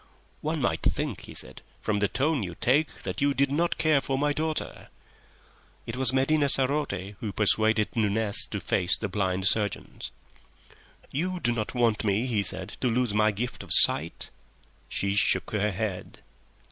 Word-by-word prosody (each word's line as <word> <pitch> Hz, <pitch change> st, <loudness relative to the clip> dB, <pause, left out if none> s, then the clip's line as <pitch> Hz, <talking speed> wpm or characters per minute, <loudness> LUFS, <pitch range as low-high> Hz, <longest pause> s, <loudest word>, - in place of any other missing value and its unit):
"One -, -, -2 dB
might -, -, 0 dB
think," -, -, -2 dB
he -, -, -11 dB
said, -, -, -2 dB, 0.2 s
"from 105 Hz, -1 st, -1 dB
the 100 Hz, -, +2 dB
tone 145 Hz, +3 st, 0 dB
you 90 Hz, -3 st, -5 dB
take 145 Hz, +5 st, 0 dB
that -, -, -4 dB
you 140 Hz, 0 st, +2 dB
did 140 Hz, 0 st, +1 dB
not 170 Hz, +4 st, 0 dB
care 155 Hz, -3 st, +3 dB
for 135 Hz, 0 st, -2 dB
my 145 Hz, +1 st, +1 dB
daughter." 155 Hz, +1 st, -4 dB, 1.0 s
It -, -, -5 dB
was 130 Hz, -1 st, +5 dB
Medina 140 Hz, +2 st, +2 dB
sarote 130 Hz, -9 st, +1 dB
who 110 Hz, -, -4 dB
persuaded 110 Hz, +1 st, +2 dB
Nunez 105 Hz, -1 st, +1 dB
to -, -, -4 dB
face 90 Hz, -2 st, +1 dB
the 110 Hz, -, -3 dB
blind 95 Hz, -1 st, -2 dB
surgeons. 105 Hz, -3 st, -1 dB, 1.0 s
"You 180 Hz, +6 st, -2 dB
do 120 Hz, -, 0 dB
not 115 Hz, +1 st, -3 dB
want 115 Hz, -3 st, +1 dB
me," 105 Hz, +3 st, +1 dB
he 115 Hz, -5 st, 0 dB
said, 95 Hz, -1 st, -3 dB
"to 130 Hz, -, +1 dB
lose 120 Hz, -2 st, 0 dB
my 105 Hz, +1 st, +3 dB
gift 120 Hz, +4 st, -4 dB
of -, -, -11 dB
sight?" 80 Hz, +4 st, +4 dB, 0.6 s
She 100 Hz, 0 st, -1 dB
shook 105 Hz, -, +2 dB
her 105 Hz, 0 st, 0 dB
head. 100 Hz, -2 st, -5 dB
110 Hz, 170 wpm, -27 LUFS, 100-140 Hz, 1.0 s, was